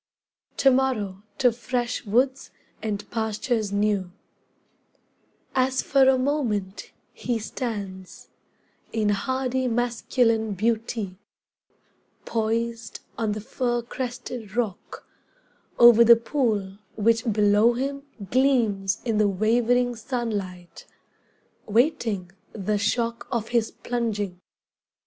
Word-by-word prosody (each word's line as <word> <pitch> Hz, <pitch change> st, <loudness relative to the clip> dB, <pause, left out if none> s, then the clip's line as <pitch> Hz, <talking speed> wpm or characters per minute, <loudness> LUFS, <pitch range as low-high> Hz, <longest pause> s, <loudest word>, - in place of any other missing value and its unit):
"To 270 Hz, -, +5 dB
morrow 230 Hz, -8 st, 0 dB, 0.2 s
to 250 Hz, -3 st, +4 dB
Fresh 245 Hz, 0 st, -3 dB
Woods 260 Hz, +5 st, +1 dB, 0.3 s
and 205 Hz, -2 st, -3 dB
Pastures 220 Hz, -1 st, -1 dB
New" 200 Hz, -3 st, 0 dB, 1.4 s
As 260 Hz, 0 st, +1 dB
for 270 Hz, -2 st, +4 dB
a 265 Hz, -, +4 dB
moment 240 Hz, -9 st, -1 dB, 0.2 s
he 240 Hz, -2 st, -2 dB
stands, 200 Hz, -6 st, -6 dB, 0.6 s
in 215 Hz, -2 st, 0 dB
hardy 260 Hz, +4 st, 0 dB
masculine 235 Hz, -2 st, +1 dB
beauty, 220 Hz, -2 st, -2 dB, 1.1 s
Poised 230 Hz, 0 st, -2 dB
on 220 Hz, -3 st, -1 dB
the 215 Hz, -, -4 dB
fircrested 240 Hz, -1 st, -4 dB
rock, 225 Hz, -6 st, -3 dB, 0.7 s
over 235 Hz, -1 st, +8 dB
the 235 Hz, 0 st, +8 dB
pool 220 Hz, -6 st, -1 dB, 0.2 s
which 225 Hz, +2 st, +2 dB
below 210 Hz, +2 st, +4 dB
him 275 Hz, +3 st, -3 dB, 0.3 s
Gleams 230 Hz, -7 st, +2 dB
in 225 Hz, -3 st, +1 dB
the 210 Hz, -1 st, +4 dB
wavering 240 Hz, +5 st, +2 dB
sunlight, 210 Hz, -7 st, -5 dB, 0.8 s
waiting 220 Hz, -, +1 dB, 0.2 s
the 210 Hz, 0 st, -1 dB
shock 230 Hz, +3 st, -1 dB
of 230 Hz, -3 st, -2 dB
his 235 Hz, -2 st, +1 dB
plunging. 210 Hz, -6 st, -3 dB
230 Hz, 95 wpm, -25 LUFS, 205-245 Hz, 1.4 s, over